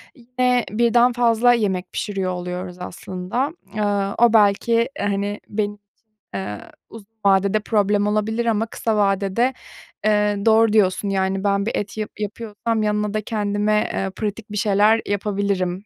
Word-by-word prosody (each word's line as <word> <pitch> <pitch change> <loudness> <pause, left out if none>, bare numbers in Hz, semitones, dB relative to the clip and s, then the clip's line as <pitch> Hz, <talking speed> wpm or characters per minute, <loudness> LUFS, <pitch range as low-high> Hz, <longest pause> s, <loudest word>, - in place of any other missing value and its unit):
yine 250 -1 0
birden 235 +2 +3
fazla 240 0 +4
yemek 195 -6 -1
pişiriyor 195 -3 -2
oluyoruz 180 0 -5
aslında. 185 - -4 0.2
Iıı, 205 -2 0
o 235 -1 +4
belki, 225 +2 +3
hani, 205 0 -1
benim 205 0 -1
için, 205 - -30 0.5
ııı, 105 +2 -4 0.3
uzun 220 -3 -12 0.2
vadede 200 +2 +3
problem 205 -1 +1
olabilir 215 +3 0
ama 225 -1 +1
kısa 225 -1 -2
vadede, 200 +5 +1 0.5
ııı, 210 -1 +1
doğru 225 -1 +4
diyorsun, 200 -1 +2
yani, 190 0 0
ben 200 0 +1
bir 225 - -1
et 205 +1 -4
yap 215 -1 -3
yapıyorsam 215 +1 -3
yanına 210 0 0
da 215 - -1
kendime, 210 0 0
ııı, 195 0 -2
pratik 210 +1 -5
bir 210 - -4
şeyler 210 +1 +3
yapabilirim. 200 -2 -1
210 Hz, 145 wpm, -21 LUFS, 195-225 Hz, 0.5 s, fazla